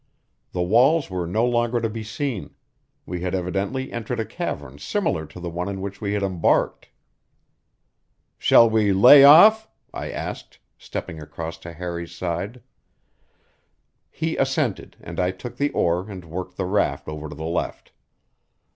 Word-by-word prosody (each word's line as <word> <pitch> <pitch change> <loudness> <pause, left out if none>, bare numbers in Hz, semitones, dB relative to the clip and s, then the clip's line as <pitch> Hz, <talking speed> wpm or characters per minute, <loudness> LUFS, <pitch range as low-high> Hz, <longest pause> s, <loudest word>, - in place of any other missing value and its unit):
The 90 - -1
walls 125 - +3
were 90 -2 -3
no 110 +7 +1
longer 120 0 +1
to 115 - -1
be 110 0 -6
seen; 110 0 -4 0.5
we 90 -1 -5
had 90 +1 -2
evidently 95 +8 -2
entered 115 -3 -4
a - - -1
cavern 70 0 -5
similar 75 +1 -2
to 80 +4 -12
the 90 - -6
one 90 +3 -3
in 95 -1 -5
which 100 0 -6
we 100 -1 -2
had 105 -1 -1
embarked. 95 -4 0 1.5
"Shall 115 - +6
we 110 -3 +2
lay 125 +9 +9
off?" 215 +10 +8 0.2
I - - -5
asked, - - -6 0.2
stepping 80 -3 -7
across 80 +2 -7
to 85 - -9
Harry's 85 0 -6
side. 95 +7 -4 1.5
He 160 +1 -3
assented, 135 -4 -1
and 85 +1 -7
I 90 0 +2
took 95 +6 -8
the 145 +1 +1
oar 90 0 0
and 95 -4 -8
worked 90 +2 -7
the 95 - -1
raft 90 -7 0
over 75 0 -6
to 75 - -9
the 80 - -7
left. 85 +2 -3
95 Hz, 155 wpm, -23 LUFS, 85-120 Hz, 1.5 s, lay